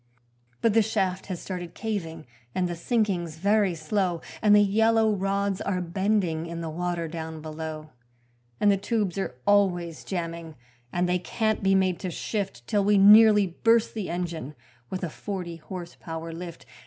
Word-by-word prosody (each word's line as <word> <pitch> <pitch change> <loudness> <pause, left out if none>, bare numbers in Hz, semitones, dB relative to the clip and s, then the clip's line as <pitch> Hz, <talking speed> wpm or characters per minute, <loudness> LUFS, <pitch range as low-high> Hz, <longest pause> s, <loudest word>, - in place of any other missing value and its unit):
But 230 -2 +3
the 225 - +5
shaft 190 -3 -1
has 185 -3 -4
started 175 -3 -6
caving 165 -8 -4 0.3
and 180 -1 +1
the 175 - -4
sinking's 180 -4 -1
very 200 0 +2
slow, 175 +2 -1 0.2
And 210 -1 +6
the 205 - +7
yellow 220 +2 +3
rods 195 0 -1
are 190 -2 -1
bending 180 -2 0
in 170 0 -5
the 165 -1 -4
water 175 0 -2
down 160 0 -6
below, 155 0 -6 0.7
And 205 - +5
the 200 - +2
tubes 200 -2 -1
are 160 -10 -3
always 175 -5 +2
jamming 165 -3 -5 0.4
and 175 0 0
they 180 0 +1
can't 220 +4 -1
be 195 -1 +3
made 185 -2 +2
to 185 - -3
shift 170 - -4
Till 205 - +1
we 205 +1 +4
nearly 210 +1 +8
burst 225 +6 +2
the 215 -4 -4
engine 170 -5 -4 0.3
with 185 0 -4
a 175 - -1
forty 180 -4 -5
horse 175 +1 -8
power 165 0 -6
lift. 170 0 -8
185 Hz, 165 wpm, -26 LUFS, 165-205 Hz, 0.7 s, nearly